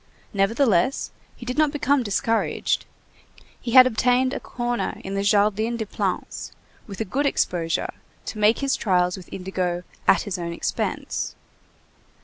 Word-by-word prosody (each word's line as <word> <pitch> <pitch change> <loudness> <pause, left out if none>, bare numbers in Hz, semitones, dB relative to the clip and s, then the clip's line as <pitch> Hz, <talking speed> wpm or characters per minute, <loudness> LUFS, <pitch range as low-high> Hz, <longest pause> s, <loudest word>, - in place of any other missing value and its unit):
Nevertheless, 205 +2 +2 0.2
he 240 - -10
did 250 +4 -2
not 305 -1 +5
become 285 -1 +2
discouraged. 225 +1 0 0.7
He 235 - -4
had 255 -1 +10
obtained 255 +2 +2
a - - -2
corner 240 -1 -3
in 195 - -5
the 195 - 0
Jardin 210 +3 +2
des 220 - -2
Plantes, 195 -3 -3 0.4
with 200 -3 -8
a - - 0
good 280 +9 0
exposure, 165 -10 0 0.3
to 215 - -5
make 210 +2 +4
his 275 -1 +1
trials 180 -3 +1
with 185 -3 -12
indigo 180 -2 -2 0.2
"at 180 - +5
his 190 -2 -4
own 170 -1 -3
expense." - - -3
215 Hz, 145 wpm, -24 LUFS, 185-250 Hz, 0.7 s, had